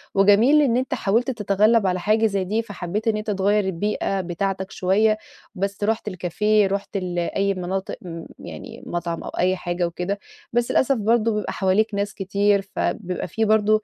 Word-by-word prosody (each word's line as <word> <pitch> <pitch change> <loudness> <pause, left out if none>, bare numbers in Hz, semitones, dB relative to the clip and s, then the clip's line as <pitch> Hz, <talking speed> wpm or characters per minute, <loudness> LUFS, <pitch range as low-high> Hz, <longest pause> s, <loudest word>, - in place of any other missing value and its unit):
وجميل 210 +10 +6
إن 250 -4 +3
أنت 260 +1 -1
حاولت 230 +7 +1
تتغلَّب 210 -1 +3
على 180 0 0
حاجة 215 +4 +2
زي 200 -3 +1
دي، 215 +5 0
فحبّيت 205 0 -4
إن 215 -1 +2
أنت 215 0 -3
تغيّر 200 +1 +2
البيئة 195 +1 -1
بتاعتك 190 +2 -3
شوية، 215 +4 +2 0.4
بس 200 +2 -3
رُحت 220 0 0
الكافيه، 205 +3 +1
رُحت 200 +1 -3
ال 180 -2 -2
أي 195 +3 0
مناطق 185 +1 -3
م 165 -2 -7
يعني - - -9
مطعم 170 -1 -3
أو - - -5
أي 185 +1 +1
حاجة 175 -1 -2
وكده، 180 +4 -3 0.3
بس 240 0 +1
للأسف 270 +1 +3
برضه 225 +1 +2
بيبقى 210 - -2
حواليك 205 +3 +1
ناس 200 +1 -1
كتير، 200 +1 +1
فبيبقى 185 -3 -2
في 220 +6 0
برضه 215 0 +3
200 Hz, 175 wpm, -23 LUFS, 185-215 Hz, 0.4 s, وجميل